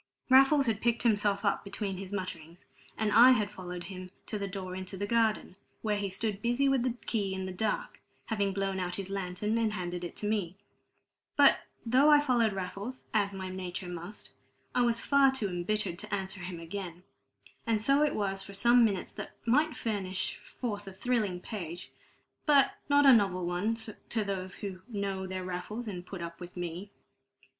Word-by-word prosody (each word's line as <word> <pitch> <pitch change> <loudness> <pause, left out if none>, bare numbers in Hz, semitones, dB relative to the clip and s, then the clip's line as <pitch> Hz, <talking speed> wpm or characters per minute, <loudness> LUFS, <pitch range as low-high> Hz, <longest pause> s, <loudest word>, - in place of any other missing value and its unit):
Raffles 270 +2 +7
had 220 -3 0
picked 235 0 +1
himself 205 -3 +2
up 200 - +1
between 200 -1 -4
his 190 0 -7
mutterings, 175 -4 -6 0.3
and 215 -1 +1
I 245 +4 +9
had 210 -4 0
followed 180 -1 -6
him 185 -1 -8 0.2
to 210 - -4
the 200 - -2
door 185 -1 -5
into 190 +1 -5
the 205 - -2
garden, 220 -3 +1 0.3
where 210 -2 +1
he 200 -1 -1
stood 200 +2 -2
busy 240 +4 +2
with 270 -2 +3
the 250 -1 0
key 200 -4 -1
in 190 0 -3
the 190 - -4
dark, - - -2 0.3
having 200 -3 0
blown 195 0 -1
out 180 -1 -1
his 195 -1 -5
lantern 195 +3 -1
and 220 -2 +1
handed 175 -2 -4
it 175 - -6
to 210 - -3
me. 195 -4 -1 0.8
But - - +6 0.3
though 260 +6 +5
I 295 -1 +8
followed 245 -6 +3
Raffles, 195 +6 -5
as 200 -2 +1
my 190 -1 -5
nature 185 -1 -5
must, 175 +4 -7 0.4
I 245 - +3
was 235 -1 +2
far 280 -1 +6
too 265 -6 -1
embittered 180 0 -1
to 210 - -7
answer 195 -1 -3
him 175 -1 -6
again. 175 0 -6 0.6
And 225 -2 +2
so 275 +6 +3
it 300 -1 +2
was 195 -2 -1
for 200 - -9
some 240 +4 +5
minutes 200 -5 0
that - - -7
might 300 +6 +3
furnish 195 -4 -2
forth 205 -5 -5
a 195 - -7
thrilling 205 -3 0
page, 175 -5 -6 0.6
but 280 -2 +6 0.2
not 285 0 +5
a 270 - +10
novel 190 -5 +3
one 180 +6 0
to 225 0 -3
those 190 -2 -4
who 190 -3 -6
know 200 -4 -3
their 185 0 -4
Raffles 185 +6 -5
and 180 -4 -5
put 180 -1 -7
up 170 0 -7
with 175 0 -9
me. 175 +3 -5
200 Hz, 190 wpm, -30 LUFS, 185-230 Hz, 0.8 s, a